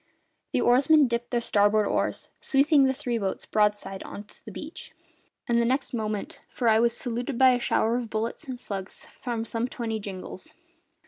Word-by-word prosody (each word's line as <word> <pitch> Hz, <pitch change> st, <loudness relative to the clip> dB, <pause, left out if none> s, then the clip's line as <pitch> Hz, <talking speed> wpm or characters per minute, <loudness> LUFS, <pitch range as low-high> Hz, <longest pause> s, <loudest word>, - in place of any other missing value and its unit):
The 250 Hz, -, +1 dB
oarsmen 275 Hz, +5 st, +5 dB
dipped 235 Hz, 0 st, -2 dB
their 240 Hz, -1 st, 0 dB
starboard 210 Hz, -1 st, +3 dB
oars, -, -, -1 dB
sweeping 280 Hz, +1 st, +4 dB
the 265 Hz, -, +2 dB
three 245 Hz, -4 st, -2 dB
boats 195 Hz, -2 st, -3 dB
broadside 210 Hz, -2 st, 0 dB
on 205 Hz, -, -8 dB
to 210 Hz, -, -16 dB
the -, -, -9 dB
beach, 315 Hz, +2 st, -8 dB, 0.5 s
and 235 Hz, 0 st, +3 dB
the -, -, +2 dB
next 260 Hz, +3 st, 0 dB
moment 215 Hz, -3 st, -3 dB, 0.2 s
I 225 Hz, -3 st, +4 dB
was 235 Hz, 0 st, +2 dB
saluted 245 Hz, +1 st, -3 dB
by 260 Hz, 0 st, +7 dB
a 245 Hz, -, +1 dB
shower 235 Hz, -1 st, +1 dB
of 240 Hz, -2 st, -4 dB
bullets 225 Hz, +8 st, -3 dB
and 255 Hz, -2 st, -5 dB
slugs 195 Hz, -5 st, -5 dB, 0.2 s
from 235 Hz, -3 st, -2 dB
some 230 Hz, +1 st, -2 dB
twenty 225 Hz, -3 st, -3 dB
jingals. 195 Hz, -3 st, -8 dB
235 Hz, 180 wpm, -27 LUFS, 215-255 Hz, 0.5 s, by